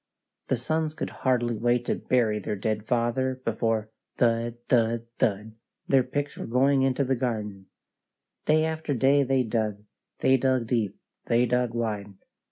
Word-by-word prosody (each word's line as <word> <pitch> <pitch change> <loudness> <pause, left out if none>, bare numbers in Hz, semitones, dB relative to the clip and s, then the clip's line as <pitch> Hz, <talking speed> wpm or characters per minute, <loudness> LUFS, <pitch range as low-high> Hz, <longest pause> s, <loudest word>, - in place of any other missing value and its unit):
The 130 - +1
sons 155 +5 -1
could - - -4
hardly 120 -3 0
wait 120 +2 +1
to - - +1
bury 115 -4 +1
their 105 - -3
dead 105 +1 -2
father 125 +2 0
before, 110 -1 -1 0.3
thud, 115 0 +1
thud, 115 -1 +2
thud, 105 +1 0 0.3
their 135 -1 +5
picks 145 +3 -3
were - - -6
going 135 +3 +3
in 135 -1 +2
the 135 -1 +1
garden. 105 -6 -3 0.8
Day 155 +1 +4
after 160 -2 -2
day 135 +4 +4
they 135 -1 +2
dug; 110 -3 -2 0.3
they 130 0 +4
dug 130 -2 +1
deep; 115 -4 -1 0.3
they 120 +1 +3
dug 125 -1 0
wide. 105 -4 -3
120 Hz, 155 wpm, -26 LUFS, 110-130 Hz, 0.8 s, their